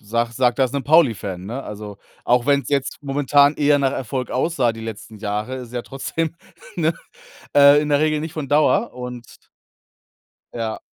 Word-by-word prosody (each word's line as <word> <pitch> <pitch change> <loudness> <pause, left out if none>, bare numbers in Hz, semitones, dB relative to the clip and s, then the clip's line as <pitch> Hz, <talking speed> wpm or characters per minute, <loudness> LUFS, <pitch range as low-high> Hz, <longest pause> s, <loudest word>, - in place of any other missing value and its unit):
sage 115 +2 -2
sage 125 0 +2
das 130 -3 +1
'nem 140 -1 -2
Pauli-Fan, 110 - +2
ne, 125 +6 -5
also, 105 -2 -8 0.3
auch 120 0 +2
wenn's 140 -1 +2
jetzt 140 -2 -1
momentan 145 +1 +3
eher 145 -1 +3
nach 135 -1 +1
Erfolg 130 0 -4
aussah 130 -3 +1
die 115 - -10
letzten 110 -1 -8
Jahre, 105 +4 -3
ist 125 -2 -8
es - - -17
ja 120 -1 -3
trotzdem 160 +5 -4 0.4
ne, - - +1 0.6
äh, 145 +1 +7
in 150 - -3
der 145 -1 +3
Regel 155 0 +1
nicht 160 0 -6
von 150 -3 -5
Dauer 155 +10 +2
und 125 -2 -9 1.1
Ja. 115 -2 -4
130 Hz, 175 wpm, -21 LUFS, 115-145 Hz, 1.1 s, äh